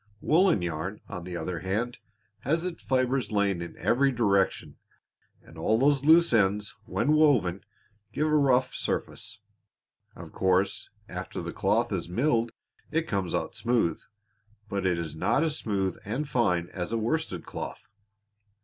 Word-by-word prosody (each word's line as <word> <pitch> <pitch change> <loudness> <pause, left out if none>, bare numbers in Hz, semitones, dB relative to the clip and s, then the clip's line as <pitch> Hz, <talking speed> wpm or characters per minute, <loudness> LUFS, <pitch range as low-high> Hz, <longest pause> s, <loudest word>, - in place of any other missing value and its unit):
Woolen 165 - +3
yarn, 85 +4 -3
on 90 -5 -7
the 90 -1 -5
other 90 -1 -3
hand, 110 +7 -2 0.4
has 160 - 0
its 180 -2 -5
fibers 130 -3 0
lying 100 -4 +1
in 85 - -7
every 135 +3 +2
direction 100 -6 +1 0.7
and 80 0 -14
all 110 +7 +2
these 140 +2 +3
loose 165 0 +6
ends, 105 -1 +2
when 120 +5 0
woven, 125 - +3 0.5
give 150 - 0
a 155 0 +2
rough 130 -3 +3
surface. - - -4 0.7
Of - - -10
course 95 +1 +1 0.2
after - - -6
the - - -5
cloth - - +1
is - - -2
milled 115 +2 +1 0.4
it 160 +1 -1
comes 95 -5 -1
out - - -2
smooth, 115 -9 0 0.7
but 100 -2 -1
it 90 -2 +1
is 80 -2 -4
not 115 - +1
as 155 -2 0
smooth 95 -3 -1
and 125 +9 -3
fine 90 - +1
as 90 +1 -5
a 115 - 0
worsted 115 - -2
cloth." - - -7
110 Hz, 150 wpm, -27 LUFS, 95-135 Hz, 0.7 s, loose